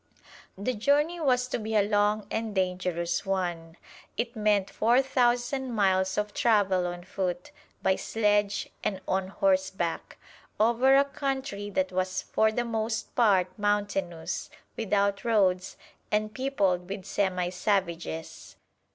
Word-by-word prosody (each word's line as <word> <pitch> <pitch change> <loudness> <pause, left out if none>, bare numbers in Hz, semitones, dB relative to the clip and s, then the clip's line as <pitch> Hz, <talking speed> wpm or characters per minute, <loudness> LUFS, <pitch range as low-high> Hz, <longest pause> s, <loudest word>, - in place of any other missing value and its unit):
The 210 +6 -1
journey 290 +9 +1
was 250 -5 +2
to - - -2
be 220 0 -3
a 210 - +5
long 210 0 +2
and 220 -2 -2
dangerous 180 -2 -1
one. 175 -4 -3 0.4
It 235 +1 -2
meant 210 -3 +1
four 240 +5 +3
thousand 250 0 +1
miles 190 -2 +2
of 210 0 -1
travel 195 -6 +2
on 175 0 -6
foot, 180 +3 -3 0.3
by 190 0 +3
sledge 205 -2 +1 0.2
and 195 -3 -1
on 190 0 0
horseback, 190 -3 -1 0.4
over 240 +5 +4
a 280 - +5
country 270 -7 -3
that 280 +6 -1
was 185 0 -1
for 220 0 +2
the 240 +2 -1
most 220 -1 -2
part 195 -6 +3
mountainous, 200 -5 -1 0.3
without 200 -2 0
roads, 195 -6 +1 0.3
and 215 0 0
peopled 195 -10 0
with 195 -1 -5
semi 185 -3 0
savages. 180 -4 -2
205 Hz, 130 wpm, -28 LUFS, 185-230 Hz, 0.4 s, a